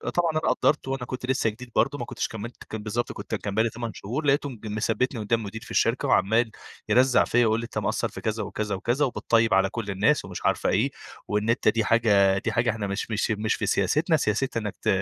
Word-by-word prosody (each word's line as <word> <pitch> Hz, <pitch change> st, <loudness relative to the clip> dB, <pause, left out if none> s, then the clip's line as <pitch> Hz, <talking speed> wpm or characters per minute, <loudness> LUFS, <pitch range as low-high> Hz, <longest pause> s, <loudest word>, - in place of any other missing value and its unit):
طبعًا 170 Hz, -2 st, +2 dB
أنا 155 Hz, -, 0 dB
قَدّرت 150 Hz, -3 st, +1 dB
وأنا 135 Hz, -2 st, -3 dB
كنت 130 Hz, 0 st, -5 dB
لسّه 125 Hz, -3 st, +1 dB
جديد 120 Hz, +2 st, -10 dB
برضه 135 Hz, +7 st, +2 dB
ما 120 Hz, -, -4 dB
كنتش 125 Hz, -1 st, -3 dB
كمِّلت 110 Hz, +2 st, -8 dB
كان 110 Hz, -1 st, -5 dB
بالضبط 115 Hz, +3 st, -2 dB
كنت -, -, -5 dB
كان 100 Hz, -1 st, -4 dB
بقى 110 Hz, -, +4 dB
لي 115 Hz, -, +1 dB
8 115 Hz, 0 st, -5 dB
شهور، 130 Hz, +10 st, -4 dB
لقيته 140 Hz, 0 st, +2 dB
م 120 Hz, -5 st, -10 dB
مثبّتني 110 Hz, +4 st, -1 dB
قُدّام 115 Hz, +2 st, +1 dB
المدير 110 Hz, +1 st, -6 dB
في -, -, -12 dB
الشركة -, -, +1 dB
وعمّال 110 Hz, +4 st, +3 dB, 0.4 s
يرزّّع 125 Hz, +4 st, +5 dB
فيّا 120 Hz, -, +1 dB
ويقول 110 Hz, +1 st, +2 dB
لي: -, -, -5 dB
"أنت 120 Hz, -, -8 dB
مقصّر،" -, -, -1 dB
في -, -, -9 dB
كذا 110 Hz, 0 st, -2 dB
وكذا 105 Hz, 0 st, -3 dB
وكذا 120 Hz, +9 st, +1 dB
وبتطيّب 115 Hz, -4 st, +1 dB
على 95 Hz, 0 st, +4 dB
كل 105 Hz, -2 st, -4 dB
الناس 110 Hz, +10 st, +2 dB
ومش -, -, -7 dB
عارفة -, -, +2 dB
إيه، -, -, +2 dB, 0.4 s
وإن 105 Hz, +2 st, -1 dB
أنت 115 Hz, -, +1 dB
دي 115 Hz, -2 st, +3 dB
حاجة 100 Hz, -4 st, +4 dB
دي -, -, -2 dB
حاجة 115 Hz, +1 st, +1 dB
إحنا 105 Hz, -2 st, -2 dB
مش 100 Hz, +3 st, -3 dB
مش 110 Hz, +1 st, 0 dB
مش 110 Hz, +1 st, 0 dB
في -, -, -3 dB
سياستنا، 155 Hz, -, +2 dB
سياستنا 115 Hz, 0 st, -1 dB
إنّك 105 Hz, -, -5 dB
ت -, -, -6 dB
115 Hz, 235 wpm, -26 LUFS, 105-125 Hz, 0.4 s, يرزّّع